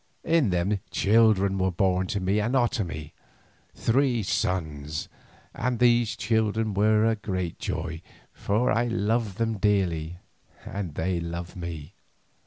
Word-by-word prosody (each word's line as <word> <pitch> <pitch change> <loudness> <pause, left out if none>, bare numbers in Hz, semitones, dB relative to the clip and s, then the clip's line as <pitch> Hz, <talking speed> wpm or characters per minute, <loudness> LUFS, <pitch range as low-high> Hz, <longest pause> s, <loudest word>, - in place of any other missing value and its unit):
In 165 -8 +3
them 95 +3 0
children 100 0 +3
were 95 0 +2
born 95 +1 +1
to 100 - -2
me 95 +3 +1
and 120 +5 0
Otomie, 105 - -1 0.6
three 125 -1 +1
sons, 75 -6 -2 0.5
and 125 0 -1
these 120 -2 +3
children 110 -1 0
were 105 +2 +3
my 115 - +3
great 95 -5 -4
joy, 80 0 -4 0.3
for 115 +6 0
I 115 +1 +2
loved 110 -2 0
them 115 -2 -1
dearly 90 -5 0 0.5
and 100 -7 -5
they 90 +1 -1
loved 85 +1 -5
me. 85 -2 -7
100 Hz, 130 wpm, -26 LUFS, 90-115 Hz, 0.6 s, In